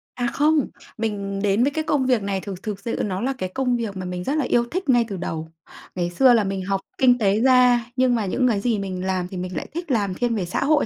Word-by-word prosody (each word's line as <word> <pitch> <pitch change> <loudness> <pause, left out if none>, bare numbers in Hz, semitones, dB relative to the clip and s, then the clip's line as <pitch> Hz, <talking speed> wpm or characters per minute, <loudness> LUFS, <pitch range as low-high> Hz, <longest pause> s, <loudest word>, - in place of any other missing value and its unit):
À, 245 -1 -1
không, 300 -1 +3 0.3
mình 200 -3 -3
đến 205 +3 +3
với 280 - +2
cái 315 +2 -2
công 290 -4 +1
việc 250 -4 +2
này 195 -1 -2
thực 190 -2 -7
thực 210 -2 -4
sự 230 +3 -3
nó 190 -2 -2
là 265 +3 0
cái 185 -6 -3
công 250 +4 0
việc 220 -5 -4
mà 185 - -5
mình 180 0 -4
rất 275 - -1
là 300 - +1
yêu 240 -1 +2
thích 370 -3 -3
ngay 240 -2 +4
từ 200 -4 -5
đầu. 160 -2 -5 0.4
Ngày 175 -1 -1
xưa 250 +8 +5
là 225 -3 +4
mình 195 -1 -2
học 195 0 -1 0.2
kinh 250 -2 +5
tế 205 -2 +2
ra 250 -2 +5
nhưng 255 -1 +3
mà 220 -3 -1
những 250 +7 +1
cái 220 -5 +1
gì 225 0 0
mình 185 -2 -4
làm 185 -1 -1
thì 185 - -7
mình 180 0 -5
lại - - -4
thích 340 -2 -4
làm 205 -6 +1
thiên 235 +4 -1
về 195 -4 -1
xã 175 - -2
hội 295 +1 +3
220 Hz, 275 wpm, -23 LUFS, 190-255 Hz, 0.4 s, xưa